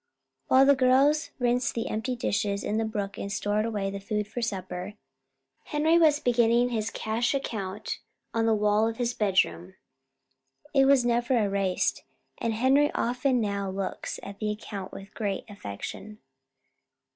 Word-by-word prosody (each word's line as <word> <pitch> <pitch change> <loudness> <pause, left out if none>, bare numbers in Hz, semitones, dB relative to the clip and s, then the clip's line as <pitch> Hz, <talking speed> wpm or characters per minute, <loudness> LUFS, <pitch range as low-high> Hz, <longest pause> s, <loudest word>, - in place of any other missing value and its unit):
While 265 +1 +6
the 280 - +7
girls 275 +4 +3
rinsed 245 0 +1
the 230 - -2
empty 235 +4 -2
dishes 200 -4 -1
in 215 - -1
the 225 - +1
brook 200 -2 -4
and 200 - -4
stored 210 +1 0
away 205 -3 -2
the 200 - -5
food 210 +1 -2
for 230 +3 -5
supper, 190 -2 -4 0.7
Henry 315 +3 +3
was 305 -3 +5
beginning 240 -1 +3
his 225 -2 -1
cash 230 +4 -1
account 205 -7 -4 0.3
on 225 0 +1
the 225 - +4
wall 210 +1 +3
of 225 0 -3
his 240 -1 0
bedroom. 190 -3 0 1.0
It 270 -1 +5
was 270 -3 +5
never 240 +1 +2
erased, 200 -3 0 0.4
and 230 -1 -1
Henry 270 +5 +3
often 250 +2 +1
now 200 -3 -1
looks 190 0 -4
at 200 0 -9
the 215 - -1
account 210 -2 -6
with 195 +1 -10
great 200 -3 -3
affection. 205 - -7
220 Hz, 155 wpm, -27 LUFS, 200-245 Hz, 1.0 s, the